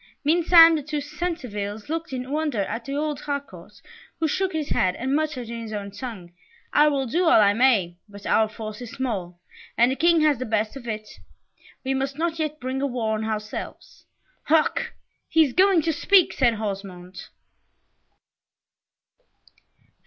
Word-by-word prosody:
Meantime, 330 +1 +7
the 305 - -1
two 300 +1 -4
Centevilles 255 - -5
looked 330 +1 -4
in 255 0 -5
wonder 295 -7 -1
at 230 +4 -5
the 275 - -4
old 300 -1 -2
Harcourt, 285 -1 -7 0.4
who 320 - +1
shook 375 +4 -1
his 310 -4 -3
head 185 -1 +1
and 265 +3 -1
muttered 300 -6 -2
in 230 0 -6
his 220 -1 -7
own 200 -1 -5
tongue, 200 -5 -8 0.4
"I 300 +1 +5
will 280 -2 +1
do 340 +10 0
all 325 - +6
I 205 -1 +5
may, 205 -8 +2
but 200 0 -12
our 220 -1 +3
force 215 +1 -8
is 245 - -7
small, 200 -10 -4 0.4
and 240 +2 +4
the - - -1
King 335 +2 +3
has 300 -5 +3
the 255 - -3
best 220 +1 -1
of 255 -3 -9
it. 215 -1 -4 0.8
We 265 0 -1
must 270 +1 -2
not 330 0 -2
yet 305 -1 -2
bring 260 +1 -3
a 280 - +1
war 235 -4 -2
on 215 0 -2
ourselves." 215 -1 -6 0.4
"Hark! 315 0 +1 0.3
he 325 - +5
is 265 - -5
going 375 -3 +4
to 325 - 0
speak," 370 +4 +4
said 240 -4 +2
Osmond. 195 -3 -6
260 Hz, 170 wpm, -24 LUFS, 215-305 Hz, 0.8 s, Meantime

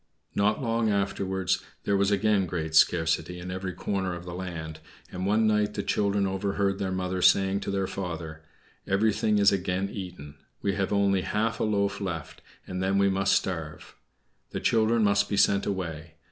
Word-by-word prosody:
Not 105 +5 +1
long 115 -1 +1
afterwards 95 -2 0 0.2
there 100 - +1
was 100 0 +2
again 100 -1 +2
great 80 -2 -3
scarcity 80 +1 +3
in 90 +1 -6
every 95 0 -4
corner 95 0 -2
of 85 0 -9
the 90 - -6
land; 80 -4 -6 0.3
and 90 +1 -3
one 110 +2 +3
night 105 -1 +1
the 100 - -2
children 100 0 +1
overheard 95 0 -1
their 95 -1 -2
mother 95 0 -2
saying 95 +1 +4
to - - -5
their 100 -1 0
father, 85 -5 -5 0.5
"Everything 105 +1 +2
is 100 -1 +5
again 95 0 -1
eaten. 90 -7 -8 0.3
We 100 - +1
have 95 0 -1
only 100 -2 +2
half 110 +4 -1
a - - +1
loaf 100 -1 0
left, 85 -7 -5 0.2
and 90 0 -4
then 95 +1 +1
we 100 0 +4
must 95 0 +2
starve. 80 -5 -3 0.5
The - - -4
children 115 0 +2
must 100 0 +2
be 100 - -1
sent 100 0 +3
away. 85 -5 -4
95 Hz, 175 wpm, -27 LUFS, 90-100 Hz, 0.5 s, is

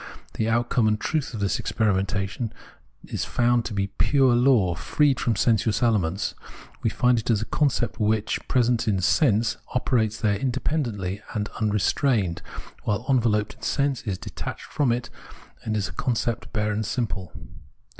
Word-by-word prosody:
The 110 - -1
outcome 120 0 +2
and 105 -1 +1
truth 150 -4 -2
of 105 - -5
this 100 - 0
experimentation 100 +1 -1 0.5
is - - -4
found 120 -1 +1
to 110 - -4
be 100 0 0
fure 125 +5 +4
law, 120 -7 +4
freed 140 - +1
from 115 - +1
sensuous 110 +2 +2
elements; 100 -6 +1 0.5
we 115 - +1
find 125 +1 +2
it 110 - -6
as 110 -3 +3
a - - -5
concept, 130 -5 0
which, 110 0 +1
while - - -22
present 120 -2 +2
in 100 -3 +2
sense, 110 - +2 0.2
operates 115 -3 +1
there 105 -2 +1
independently 120 - -2
and 105 -1 -1
un 110 -1 +1
restrained, 105 - +1 0.4
while 105 +3 -1
enveloped 115 -6 +2
in - - -24
sense, 140 -3 0
is 100 -4 -3
detached - - -7
from 140 -5 0
it, 120 0 -2 0.5
and 110 0 -1
is 100 - -1
a - - -9
concept 120 -3 -2
bare 105 -1 0
and 105 0 -2
simple. 100 -8 -3
110 Hz, 165 wpm, -25 LUFS, 105-125 Hz, 0.5 s, fure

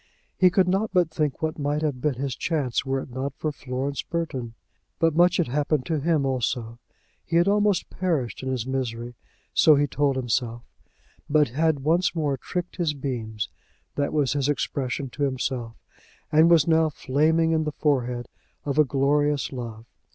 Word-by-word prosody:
He 185 - +5
could 185 0 +3
not 195 +4 +1
but 180 -4 +2
think 150 -2 -2
what 155 0 -2
might 145 +2 -1
have 140 -5 -1
been 150 -2 +1
his 135 0 -3
chance 145 -8 -1
were 135 0 -1
it 130 - -10
not 135 +2 -4
for 155 - -2
Florence 140 0 -3
Burton! 130 -9 -4 0.4
But 165 -2 +2
much 175 +1 +4
had 175 - +1
happened 145 +1 0
to 160 -3 -1
him 155 -1 +1
also. 120 -3 -2 0.4
He 165 - -4
had 170 +2 +4
almost 205 -2 +2
perished 160 -10 -1
in 130 - -3
his 125 -3 -2
misery; 120 -3 -3 0.4
so 155 - +6
he 145 +1 +3
told 145 -1 0
himself; 120 -2 -1 0.7
but 150 -3 +4
had 155 +3 +1
once 170 +6 +2
more 150 -4 0
"tricked 180 +8 -5
his 165 -5 0
beams," 115 -6 -4 0.5
that 145 -1 -1
was 145 -4 +1
his 145 -1 0
expression 135 -2 -2
to 145 - -8
himself, 130 -4 -2 0.6
and 160 +2 +6
was 165 -3 +5
now 160 -1 +4
"flaming 155 +4 +1
in 160 -1 +2
the 150 - -2
forehead" 125 -5 0 0.4
of 145 0 0
a - - +8
glorious 145 +1 +1
love. 115 -4 -7
145 Hz, 175 wpm, -25 LUFS, 130-160 Hz, 0.7 s, a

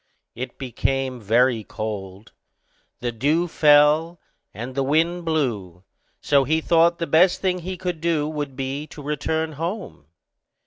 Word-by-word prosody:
It 125 +1 -7
became 130 0 -2
very 115 +2 +2
cold, 100 -1 -6 0.7
the 120 0 -1
dew 150 +9 +1
fell, 155 +2 +4 0.3
and 115 +6 -7
the 135 - -1
wind 165 +5 +1
blew; 110 - -2 0.4
so 140 -1 +3
he 160 +4 +1
thought 170 +1 +3
the 170 - -2
best 175 +3 +4
thing 185 -1 0
he 185 +2 -6
could 175 -3 -4
do 160 -3 0
would 145 -3 -4
be 135 +3 -4
to 150 - -11
return 155 +2 -2
home. 165 - -6
145 Hz, 140 wpm, -23 LUFS, 125-165 Hz, 0.7 s, fell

